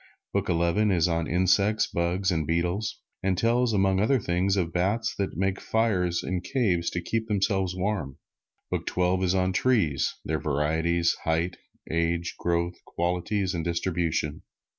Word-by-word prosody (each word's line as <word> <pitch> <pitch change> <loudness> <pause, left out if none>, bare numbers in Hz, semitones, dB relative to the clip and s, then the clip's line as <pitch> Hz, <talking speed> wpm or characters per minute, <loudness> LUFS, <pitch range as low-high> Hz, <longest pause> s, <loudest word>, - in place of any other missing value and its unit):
Book - - 0
Eleven 85 +5 +2
is 90 -4 +3
on 85 -1 0
insects, 95 +5 +3
bugs 90 +3 0
and 80 -4 -1
beetles, 90 +6 -1 0.2
and 95 -1 0
tells, 120 +3 +2
among 95 -2 +2
other 125 +6 +3
things, 95 +1 0
of 85 -3 -1
bats 105 +6 0
that 95 -5 -2
make 95 +1 0
fires 90 -7 +1
in 90 -1 -2
caves 90 -8 0
to 85 - -3
keep 110 +4 -2
themselves 95 -3 0
warm. 95 -8 -2 0.5
Book - - -2
Twelve 90 +1 +1
is 90 0 +2
on 95 0 +1
trees, 95 - +1
their 80 0 -1
varieties, 80 +4 +1
height, 85 +2 0 0.3
age, 85 +1 0
growth, 85 0 -1
qualities 90 +3 -1
and 85 -2 -2
distribution. 85 -3 -1
90 Hz, 150 wpm, -27 LUFS, 85-100 Hz, 0.5 s, is